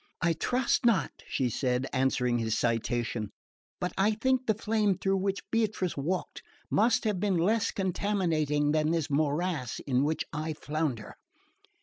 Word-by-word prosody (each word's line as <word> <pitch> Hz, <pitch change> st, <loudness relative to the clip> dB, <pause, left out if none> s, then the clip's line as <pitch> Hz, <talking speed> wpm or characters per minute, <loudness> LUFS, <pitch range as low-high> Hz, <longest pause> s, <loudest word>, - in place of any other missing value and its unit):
"I 170 Hz, -1 st, +2 dB
trust 245 Hz, +10 st, 0 dB
not," 215 Hz, -, +3 dB, 0.2 s
she 130 Hz, -, 0 dB
said, 125 Hz, +2 st, 0 dB
answering 130 Hz, -2 st, +1 dB
his 110 Hz, -1 st, 0 dB
citation; 115 Hz, -2 st, -1 dB, 0.5 s
"but 180 Hz, -, -2 dB
I 210 Hz, +3 st, +4 dB
think 260 Hz, +3 st, 0 dB
the 220 Hz, -, +3 dB
flame 210 Hz, -3 st, +1 dB
through 195 Hz, 0 st, +1 dB
which 195 Hz, +1 st, -2 dB
Beatrice 215 Hz, -5 st, 0 dB
walked 170 Hz, +7 st, -3 dB, 0.3 s
must 225 Hz, +2 st, +3 dB
have 210 Hz, -4 st, 0 dB
been 195 Hz, -2 st, +1 dB
less 205 Hz, +6 st, +2 dB
contaminating 165 Hz, -7 st, 0 dB
than 155 Hz, 0 st, +2 dB
this 160 Hz, -2 st, -1 dB
morass 150 Hz, -2 st, 0 dB
in 130 Hz, -1 st, +2 dB
which 155 Hz, +2 st, 0 dB
I 155 Hz, +1 st, -2 dB
flounder." 150 Hz, -6 st, -3 dB
165 Hz, 145 wpm, -29 LUFS, 140-200 Hz, 0.5 s, I